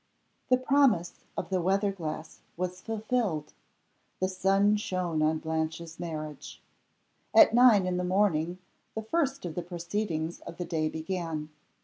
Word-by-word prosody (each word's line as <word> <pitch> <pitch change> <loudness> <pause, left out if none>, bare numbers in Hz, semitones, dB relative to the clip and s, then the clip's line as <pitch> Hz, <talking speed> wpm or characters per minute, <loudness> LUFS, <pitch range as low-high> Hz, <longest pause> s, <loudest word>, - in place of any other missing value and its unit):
THE 255 - +6
promise 255 -9 +2
of - - -4
the 185 -1 +1
weather 195 +3 +2
glass 160 -4 -6 0.2
was 180 +1 -3
fulfilled. 220 -8 -2 0.7
The 185 - +1
sun 195 +2 +3
shone 180 -6 -1
on 155 +1 +3
Blanche's 160 +1 -3
marriage. 155 -4 -6 0.8
At 320 -8 +8
nine 235 -5 +6
in 180 -1 0
the 180 - -1
morning 180 -3 +1 0.4
the 220 - -3
first 275 - 0
of 170 - -4
the 175 - -3
proceedings 170 -1 -3
of 170 - -10
the 175 - -3
day 160 -2 0
began. 160 -2 -4
180 Hz, 140 wpm, -29 LUFS, 160-205 Hz, 0.8 s, At